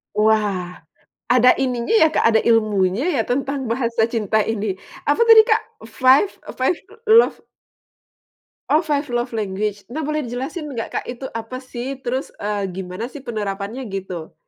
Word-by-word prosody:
Wah, 210 -4 +1 0.5
ada 250 0 +6
ininya 250 -3 -1
ya 440 -8 +6
Kak, - - +2
ada 220 -1 +4
ilmunya 215 -2 +2
ya 235 - +2
tentang 270 +1 -2
bahasa 235 -2 0
cinta 220 -1 +1
ini? 220 -1 -2 0.4
Apa - - +2
tadi, 450 -1 +10
Kak? - - +4 0.3
Flve 260 - +4 0.2
e - - -3
five 260 +7 +1 0.3
love 455 +2 +6 1.3
Oh, 310 - +4
five 295 -3 -1
love 240 +1 0
language. 205 -2 -3
Nah, 315 - -3
boleh 305 -1 -2
dijelasin 265 +7 -5
nggak 230 -2 -4
Kak, - - -4
itu 250 +2 -6
apa 230 +3 -7
sih 260 +1 -6
terus, 255 +2 -3
eee, 205 -1 -1
gimana 185 +3 -5
sih 270 +3 -9
penerapannya 215 0 -4
gitu? 185 -4 -6
235 Hz, 155 wpm, -21 LUFS, 210-265 Hz, 1.3 s, tadi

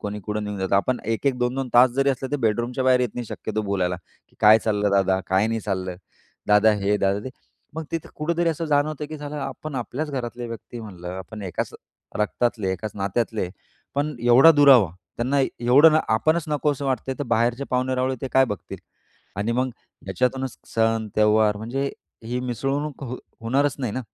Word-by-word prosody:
कोणी 105 0 -5
कुठं 105 +2 -3
निघून 105 -1 -5
जातात. 95 +1 +1
आपण 125 +6 0
1-1 125 +4 0
2-2 125 +2 -1
तास 125 +1 +7
जरी 135 +3 +2
असले 130 0 -4
ते 145 - +2
बेडरूमच्या 120 +4 -1
बाहेर 130 -1 +4
येत 125 - +1
नाही 120 - -4
शक्यतो 110 0 -4
बोलायला, 95 -3 -1 0.3
की - - -30
"काय 105 +1 +8
चाललं 105 -2 0
दादा, 95 -1 +3
काय 95 +3 +2
नाही 115 0 -1
चाललं, 95 -3 -3 0.5
दादा 105 +1 +6
हे, 100 +1 +2
दादा 100 0 +1
ते." 130 - -5 0.4
मग 160 0 -4
तिथं 165 -1 -3
कुठेतरी 170 +2 0
असं 165 0 -2
जाणवतं, 150 0 0
की 155 +1 -8
साला 145 0 -5
आपण 135 +2 -6
आपल्याच 135 +5 -3
घरातले 120 -2 -4
व्यक्ती 115 +1 -8
म्हणलं, 90 -5 -9
आपण 105 +3 -8
एकाच 95 -2 -4 0.4
रक्तातले, 105 -1 0
एकाच 105 +3 -5
नात्यातले 100 0 -1 0.5
पण 145 +2 -1
एवढा 120 +6 +7
दुरावा, 135 - +6 0.3
त्यांना 130 +4 0
एवढं 135 +4 +5
न 155 - +5 0.2
आपणच 155 +8 +1
नको 150 0 +1
असं 140 0 -6
वाटतंय 130 0 -1
तर 145 - -2
बाहेरचे 120 +3 +1
पाहुणे-रावळे 130 +1 0
ते 135 - -3
काय 135 0 +6
बघतील? 105 -6 -6 0.6
आणि 105 +3 -1
मग 130 +2 0 0.4
याच्यातूनच 130 0 -1 0.2
सण, 115 -1 +1
त्यौहार 105 0 +3
म्हणजे 125 +6 -3 0.3
ही 125 +2 -2
मिसळणूक 135 +4 -3
हो 125 0 -5 0.2
होणारच 135 +5 +1
नाही 125 -6 -2
ना? 130 - -2
120 Hz, 180 wpm, -23 LUFS, 105-135 Hz, 0.6 s, काय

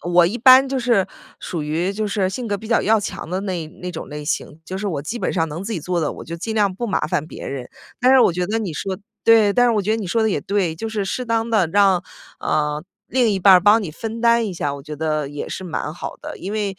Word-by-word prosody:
我 175 0 +4
一 200 +7 -2
般 260 +2 +7
就 270 - -1
是 235 -6 +2 0.3
属 165 -4 -4
于 165 +6 -1
就 215 +1 -2
是 200 -2 0
性 240 +5 -4
格 205 - 0
比 220 - -10
较 235 - +3
要 220 +1 +4
强 195 - -6
的 185 +2 -2
那 180 -5 -3
那 180 +2 -8
种 - - -7
类 150 0 -7
型， 150 0 -3
就 190 +3 -5
是 205 - -3
我 155 -8 -2
基 240 +9 -4
本 - - -1
上 165 -3 0
能 160 +5 -6
自 225 - -4
己 175 - -3
做 175 +2 -1
的， 155 - 0
我 - - -9
就 170 - -6
尽 220 +6 -4
量 205 -3 +2
不 235 +5 -3
麻 200 - 0
烦 155 -1 -1
别 - - -8
人。 130 -3 -5 0.3
但 255 +2 +5
是 265 - +7
我 210 - +5
觉 180 +1 -1
得 220 +4 -1
你 205 -7 -3
说 190 +5 -3 0.3
对， 220 -3 +6
但 245 +3 +4
是 240 - +3
我 210 -2 +1
觉 210 - -1
得 220 - +2
你 215 -4 -4
说 225 +6 +1
得 220 - +2
也 - - 0
对， 195 -5 0
就 225 +8 -5
是 215 -2 -2
适 250 +6 -3
当 230 -1 0
的 215 -7 +3
让， 190 0 +3 0.4
呃， 150 0 0 0.2
另 245 -3 +2
一 195 - 0
半 190 0 +7
儿 180 - +7
帮 210 +4 +5
你 175 - -5
分 225 +7 -6
担 235 -1 +4
一 200 - -4
下， 145 -5 -2
我 140 - -9
觉 150 +1 -7
得 155 -2 -1
也 145 0 -6
是 - - -5
蛮 160 -3 -3
好 - - -6
的。 - - -7
因 195 +3 -5
为 205 -3 -2
195 Hz, 310 characters per minute, -21 LUFS, 165-225 Hz, 0.4 s, 般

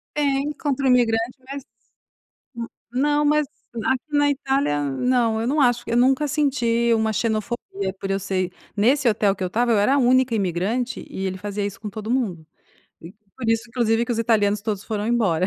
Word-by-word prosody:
Tem, 285 0 +1
contra 280 -2 -2
o - - +4
imigrante 235 0 +2
mas 275 -1 -6 1.3
não, 295 +3 +2
mas 300 0 +3 0.4
aqui 260 -1 +1
na 290 0 +4
Itália 270 - 0
não, 230 - +1
eu 230 - -1
não 295 +1 +2
acho 245 -1 +3
que 240 - -8
eu - - +2
nunca 265 +4 +3
senti 235 -5 +1
uma 220 -1 +1
xenofobia 215 -3 -2
por 195 - -5
eu 195 - +1
ser 185 -1 -2 0.2
nesse 250 +5 +3
hotel 205 -2 +2
que 190 - -7
eu - - +1
estava, 235 +5 +1
eu 215 - +3
era 210 +7 +3
a 285 - +3
única 255 -1 +3
imigrante 205 +6 -1
e 190 - -5
ele 185 0 -3
fazia 205 +1 -3
isso 200 -1 -5
com 215 - -5
todo 215 +2 -6
mundo, 195 -11 -1 0.5
e 165 +3 -11 0.2
por 230 -4 -4
isso 225 0 +2
inclusive 230 -1 +1
que 240 - -2
os 230 - -3
italianos 210 -3 +2
todos 205 -2 -3
foram 210 -1 -3
embora. 190 -7 +2
230 Hz, 195 wpm, -23 LUFS, 205-260 Hz, 1.3 s, o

